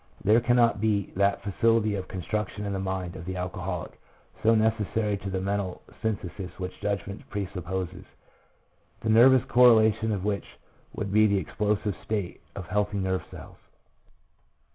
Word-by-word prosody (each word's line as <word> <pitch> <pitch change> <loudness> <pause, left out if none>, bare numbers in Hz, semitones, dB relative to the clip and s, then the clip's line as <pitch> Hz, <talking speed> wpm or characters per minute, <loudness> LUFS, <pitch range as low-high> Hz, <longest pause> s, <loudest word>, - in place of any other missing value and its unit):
There 110 +3 +5
cannot 120 -3 +3
be 105 -3 +1
that 100 +1 +1
facility 110 +2 +2
of 95 -2 -4
construction 105 +2 -3
in 100 - -2
the 95 - -2
mind 95 -2 -3
of 85 - -7
the 95 +1 -4
alcoholic, 90 0 -5 0.4
so 115 +1 +4
necessary 110 -1 +1
to 100 0 -6
the 95 0 -2
mental 95 -1 -2 0.2
synthesis 95 -4 -4
which 90 -1 -6
judgment 100 -1 -4
presupposes, 95 -2 -4 1.0
the 110 - -2
nervous 125 +3 +7
correlation 110 -3 +5
of 100 -2 -2
which 100 -1 -3 0.4
would 100 -2 -3
be 110 0 +6
the 100 -1 +2
explosive 105 0 -1
state 100 -5 -3
of 95 - -6
healthy 105 +1 -1
nerve 95 -1 0
cells. - - -11
100 Hz, 145 wpm, -27 LUFS, 95-110 Hz, 1.0 s, nervous